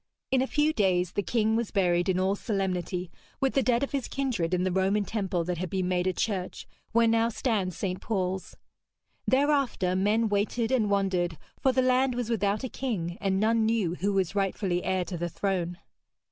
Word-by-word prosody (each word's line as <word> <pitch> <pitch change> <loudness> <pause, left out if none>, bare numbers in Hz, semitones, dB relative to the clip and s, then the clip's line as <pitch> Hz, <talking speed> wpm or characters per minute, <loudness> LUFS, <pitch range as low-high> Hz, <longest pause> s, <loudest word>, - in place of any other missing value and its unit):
In 260 -1 +3
a 265 - 0
few 300 +2 +2
days 180 - +2
the 205 - -1
king 220 +1 +1
was 230 -1 0
buried 175 -2 +2
in 185 -1 +2
all 190 +1 +2
solemnity 185 -3 -2 0.3
with 270 -1 +1
the 270 - +3
dead 245 0 +2
of 280 - -2
his 275 -3 -2
kindred 245 -12 -1
in 180 0 +1
the 185 - 0
Roman 195 +3 +1
temple 190 -6 -1
that 175 0 -3
had 185 0 -3
been 185 0 -1
made 180 0 +1
a - - +3
church, 190 -4 -3 0.2
where 230 0 +4
now 225 0 +3
stands 210 -7 -1
St. 185 -2 -3
Paul's. 190 -3 -2 0.7
Thereafter 270 -9 +2
men 210 +4 +2
waited 215 +3 0
and 230 -6 +2
wondered, 185 -4 0 0.2
for 265 - +3
the 260 0 +2
land 255 0 +3
was 240 -1 -2
without 205 +1 0
a - - -1
king, 200 -10 -3
and 195 -1 +1
none 225 +2 +3
knew 220 -6 +1
who 195 +3 -1
was 190 -2 0
rightfully 195 -2 0
heir 185 -1 0
to 175 -2 -5
the 175 0 -2
throne. 175 -2 -2
200 Hz, 200 wpm, -28 LUFS, 185-230 Hz, 0.7 s, where